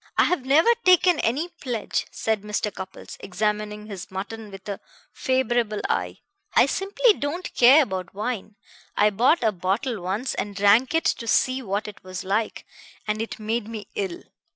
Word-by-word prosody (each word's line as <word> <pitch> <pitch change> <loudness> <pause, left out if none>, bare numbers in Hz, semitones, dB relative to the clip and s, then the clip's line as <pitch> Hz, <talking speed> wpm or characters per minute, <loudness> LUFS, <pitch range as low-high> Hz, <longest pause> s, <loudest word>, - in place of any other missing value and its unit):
"I - - +6
have 280 -8 0
never 315 - +5
taken 365 -2 +5
any 285 +10 0
pledge," 255 -11 -3
said 220 -2 -1
Mr. 210 0 -2
Cupples, 190 0 -9
examining 210 +1 -2
his 200 -4 -8
mutton 210 +3 -6
with 195 0 -11
a 200 -1 -4 0.3
favorable 240 -4 0
eye. - - -2 0.3
"I - - +7
simply 420 +4 +2
don't 335 +2 -4
care 265 +6 +7
about 185 -6 -5
wine. 215 -1 -4 0.4
I 210 0 +4
bought 245 - +3
a 220 - +3
bottle 200 +5 -2
once 195 +8 -2
and 205 0 -4
drank 210 +9 +4
it 325 - +1
to 230 - 0
see 255 +3 +2
what 205 -2 -2
it 210 - -10
was 185 0 -6
like, 205 +4 -1 0.4
and 210 +1 -1
it 225 - -5
made 220 +1 -2
me 215 -3 -7
ill. 190 -4 -4
215 Hz, 170 wpm, -24 LUFS, 200-260 Hz, 0.4 s, I